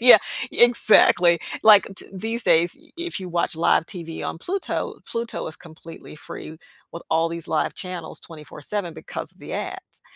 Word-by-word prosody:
yeah. 240 -2 +9 0.3
Exactly. 210 -7 +5 0.2
Like, 210 -2 +7
t - - +1
these 225 +5 -2
days, 170 +2 +3
i 325 - -22
if 345 -6 -3
you 185 - -6
watch 170 -1 -1
live 165 0 +2
TV 165 -4 -7
on - - -4
Pluto, 380 - -3
Pluto 230 0 -4
is 155 - -6
completely 165 -1 -12
free 155 +1 -9 0.4
with 170 - -8
all 165 +1 +2
these 170 -1 -5
live - - 0
channels 180 -3 -6
24/7 165 +3 -6
because - - -7
of - - -26
the - - -9
ads. - - -6
175 Hz, 165 wpm, -23 LUFS, 165-220 Hz, 0.4 s, yeah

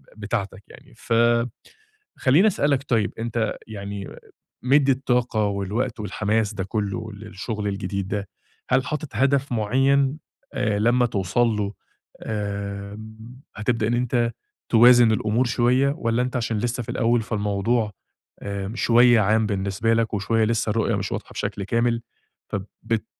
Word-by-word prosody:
ب - - -18
بتاعتك 100 -2 -3
يعني. - - -16
فخلّيني 140 - 0
أسألك 145 -8 +1
طيب، 110 -4 +1
أنت 115 -1 -1
يعني 100 -2 -6 0.5
مدي 135 +1 +4
الطاقة 125 -4 +1
والوقت 105 +5 -2
والحماس 105 +1 -1
ده 95 - -3
كله 110 +2 -3
للشغل 105 0 -5
الجديد 100 -1 -3
ده، 100 -2 -3 0.4
هل 130 0 +3
حاطط 150 +1 -4
هدف 135 0 +2
مُعيّن 135 +6 +2 0.4
آآ 105 -4 0
لمّا 120 +3 +3
توصل 100 +3 +1
له، 105 -2 -1 0.5
آمم، 105 +3 -6
هتبدأ 110 0 0
إن 120 - 0
أنت 120 -1 +1 0.4
توازن 120 0 +7
الأمور 110 +3 +1
شوية 125 +3 +2
والّا 115 -5 0
أنت 125 0 -2
عشان 115 -2 -1
لسه 120 +2 -2
في 120 - -12
الأول 120 -1 +2
فالموضوع، 105 +1 0 0.5
آآ 100 0 -4
شوية 120 0 +5
عام 110 +2 +3
بالنسبة 100 +2 0
لك 115 -1 0
وشوية 110 +3 +1
لسه 110 -1 0
الرؤية 115 0 +1
مش - - -3
واضحة - - -5
بشكل 100 - -3
كامل 115 +2 0 0.5
ف - - -3 0.3
بت 110 -1 -1
115 Hz, 135 wpm, -23 LUFS, 105-125 Hz, 0.5 s, توازن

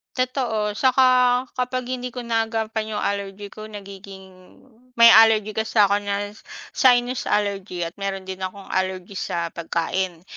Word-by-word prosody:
Totoo 250 -5 -1
atsaka 255 +1 +3
kapag 255 0 -2
hindi 250 -1 -4
ko 245 - -5
naagampan 225 -1 -2
'yong - - -2
allergy 200 0 -3
ko 215 0 -9
nagiging 195 -2 -12 0.4
may 235 0 +9
allergy 220 -1 +5
kasi 220 +1 -3
ko 200 -1 +5
na 205 0 -3 0.4
sinus 245 -1 +2
allergy, 195 -4 -1
at 170 - -7
meron 195 -1 -3
din 190 0 -7
akong 190 +1 -6
allergy 190 0 -2
sa 170 -3 -3
pagkain. 170 +1 -3
205 Hz, 140 wpm, -22 LUFS, 190-235 Hz, 0.4 s, may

